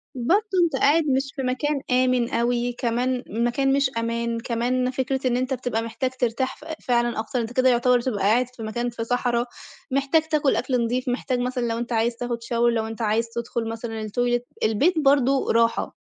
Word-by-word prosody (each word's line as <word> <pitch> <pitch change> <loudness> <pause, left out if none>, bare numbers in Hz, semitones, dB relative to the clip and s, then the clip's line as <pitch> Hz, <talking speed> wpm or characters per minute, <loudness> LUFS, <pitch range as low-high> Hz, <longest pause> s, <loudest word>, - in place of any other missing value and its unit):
برضو 375 - +1
أنت 330 -5 +1
قاعد 315 +4 +4
مش 270 +1 0
في 270 - -3
مكان 275 +3 -1
آمن 250 -1 +2
أوي، 240 +1 0
كمان 245 +2 -1
مكان 240 +5 +1
مش 280 -1 +2
أمان، 230 0 -1
كمان 250 +2 -1
فكرة 260 0 -1
إن 245 0 +1
أنت 255 +1 -1
بتبقى 245 -3 -2
محتاج 230 +3 -3
ترتاح 250 +2 0
ف - - -15 0.2
فعلًا 240 -2 +1
أكتر، 225 +3 -2
أنت 230 +1 -5
كده 255 +1 +4
يعتبر 245 +1 +4
بتبقى 235 -4 -2
قاعد 235 +5 +3
في 225 - -8
مكان 240 +3 -2
في 235 -1 -5
صحرا، 240 0 0 0.5
محتاج 275 +4 +2
تاكل 305 -3 +1
أكل 250 -2 0
نضيف، 250 +3 -1
محتاج 250 0 -1
مثلًا 250 -1 -1
لو 230 - -1
أنت 240 +1 -4
عايز 230 +1 +1
تاخد 235 0 -4
شاور 235 0 +2
لو 220 -1 -1
أنت 225 +1 -7
عايز 225 +1 +1
تدخل 235 -1 -3
مثلًا 225 -1 -5
التويلت 240 +3 -1 0.2
البيت 290 - +2
برضه 275 -2 +3
راحه. 230 0 +1
245 Hz, 190 wpm, -24 LUFS, 230-260 Hz, 0.5 s, قاعد